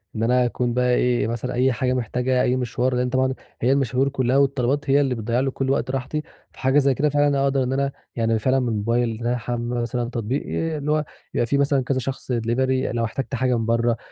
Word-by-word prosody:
إن 110 Hz, -, -1 dB
أنا 125 Hz, +1 st, +3 dB
أكون 120 Hz, 0 st, -1 dB
بقى 125 Hz, 0 st, +2 dB
إيه، 125 Hz, -3 st, +1 dB
مثلًا 120 Hz, +2 st, -3 dB
أي 130 Hz, +2 st, +2 dB
حاجة 125 Hz, +1 st, 0 dB
محتاجها، 125 Hz, +1 st, 0 dB
أي 125 Hz, -, +2 dB
مشوار 125 Hz, 0 st, -1 dB
لإن 125 Hz, 0 st, 0 dB
طبعًا 130 Hz, +1 st, +1 dB, 0.3 s
هي 125 Hz, +3 st, +3 dB
المشاوير 135 Hz, 0 st, +2 dB
كلّها 130 Hz, -1 st, +1 dB
والطلبات 140 Hz, 0 st, +1 dB
هي 140 Hz, +1 st, +5 dB
اللي 135 Hz, -3 st, 0 dB
بتضيّع 115 Hz, +2 st, -1 dB
لي 135 Hz, +1 st, 0 dB
كلّ 135 Hz, 0 st, -2 dB
وقت 135 Hz, -2 st, 0 dB
راحتي، 135 Hz, +3 st, -3 dB, 0.3 s
فحاجة 135 Hz, +2 st, +2 dB
زي 140 Hz, -1 st, +3 dB
كده 150 Hz, +3 st, +1 dB
فعلًا 145 Hz, -1 st, +2 dB
أقدَر 135 Hz, -1 st, +2 dB
إن 130 Hz, +1 st, -1 dB
أنا 140 Hz, 0 st, 0 dB, 0.2 s
يعني 115 Hz, -1 st, +1 dB
فعلًا 130 Hz, +4 st, +2 dB
من 125 Hz, -, -1 dB
الموبايل 115 Hz, +1 st, 0 dB
إن 115 Hz, -, -6 dB
أنا 125 Hz, -, +1 dB
أحمِّل 120 Hz, 0 st, -3 dB
مثلًا 120 Hz, 0 st, -2 dB
تطبيق 120 Hz, +3 st, -2 dB
آآ، 165 Hz, -1 st, -2 dB
اللي 150 Hz, +1 st, -2 dB
هو 155 Hz, 0 st, +1 dB, 0.3 s
يبقى 120 Hz, -, +1 dB
في 140 Hz, +4 st, +1 dB
مثلًا 140 Hz, -2 st, +2 dB
كذا 130 Hz, +1 st, 0 dB
شخص 130 Hz, 0 st, -5 dB
delivery 120 Hz, +3 st, 0 dB, 0.3 s
لو 115 Hz, -, +1 dB
احتاجت 130 Hz, +3 st, -4 dB
حاجة 125 Hz, 0 st, +1 dB
من 115 Hz, -, -2 dB
برّه 115 Hz, 0 st, +1 dB
125 Hz, 230 wpm, -23 LUFS, 120-135 Hz, 0.3 s, هي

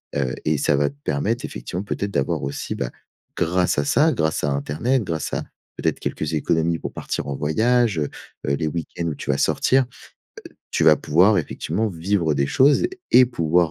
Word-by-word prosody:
Heu, 65 Hz, -2 st, 0 dB
et 75 Hz, -1 st, +2 dB
ça 70 Hz, -, +2 dB
va 70 Hz, 0 st, +2 dB
te 70 Hz, -, -16 dB
permettre, 105 Hz, +12 st, -1 dB
effectivement, 85 Hz, +10 st, -5 dB
peut-être 100 Hz, 0 st, -3 dB
d'avoir 70 Hz, -7 st, 0 dB
aussi, 70 Hz, +1 st, -4 dB
bah, -, -, -3 dB, 0.5 s
grâce 90 Hz, +1 st, +1 dB
à 70 Hz, -, 0 dB
ça, 150 Hz, -, +3 dB
grâce 80 Hz, 0 st, 0 dB
à 75 Hz, -, 0 dB
internet, 75 Hz, -, 0 dB
grâce 80 Hz, -4 st, -3 dB
à -, -, -1 dB, 0.3 s
peut-être, -, -, -1 dB
quelques 75 Hz, 0 st, -3 dB
économies 80 Hz, +1 st, +1 dB
pour -, -, -6 dB
partir -, -, -4 dB
en 70 Hz, -, -3 dB
voyage, 110 Hz, -, +2 dB
heu 75 Hz, -, 0 dB, 0.4 s
heu, 70 Hz, -, +2 dB
les 80 Hz, -, -2 dB
week-ends 85 Hz, +2 st, -4 dB
où 75 Hz, -, -2 dB
tu -, -, -8 dB
vas 70 Hz, -, 0 dB
sortir. 135 Hz, +1 st, +3 dB, 0.7 s
Heu, -, -, -25 dB, 0.2 s
tu -, -, +1 dB
vas 75 Hz, -1 st, +7 dB
pouvoir, 90 Hz, +9 st, +4 dB
effectivement, 105 Hz, +6 st, -2 dB
vivre 85 Hz, -3 st, 0 dB
des 70 Hz, -, +1 dB
choses 135 Hz, -, +4 dB, 0.3 s
et 130 Hz, -, +8 dB
pouvoir 85 Hz, -7 st, +1 dB
80 Hz, 195 wpm, -22 LUFS, 75-100 Hz, 0.7 s, et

